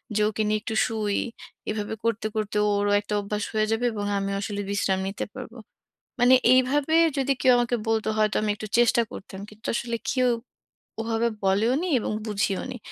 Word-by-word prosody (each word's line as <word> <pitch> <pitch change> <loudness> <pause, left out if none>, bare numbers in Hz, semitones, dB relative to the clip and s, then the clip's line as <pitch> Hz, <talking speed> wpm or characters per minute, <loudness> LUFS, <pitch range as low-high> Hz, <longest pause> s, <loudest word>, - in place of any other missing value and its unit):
যে 210 - +2
ওকে 215 0 -2
নিয়ে 215 0 +1
একটু 225 -1 -4
শুই, 215 -2 -1 0.5
এভাবে 215 0 -3
করতে, 230 -1 -1
করতে 210 -1 -2 0.2
ওরও 205 0 +1
একটা 210 0 -6
অভ্যাস 210 +1 -3
হয়ে 215 0 +2
যাবে, 230 +2 0
এবং 205 -1 -3
আমিও 195 0 -2
আসলে 205 -1 -3
বিশ্রাম 195 -2 0
নিতে 195 - -4
পারব। 255 -3 -8 0.7
মানে 245 +1 +6 0.2
এইভাবে 275 +5 +2 0.2
যদি 275 0 +2
কেউ 260 - +5
আমাকে 240 0 +1
বলত, 225 -1 +1
হয়তো 215 -1 +2
আমি 215 - -1
একটু 215 0 -7
চেষ্টা 240 0 +4
করতাম। 190 -1 -9
কিন্তু 215 +2 -17
আসলে 235 0 -2 0.2
কেউ 255 -2 +2 0.7
ওভাবে 225 +1 0 0.2
বলেওনি, 230 - +2
এবং - - -3
বুঝিওনি। 210 +4 -2
220 Hz, 170 wpm, -25 LUFS, 205-240 Hz, 0.7 s, মানে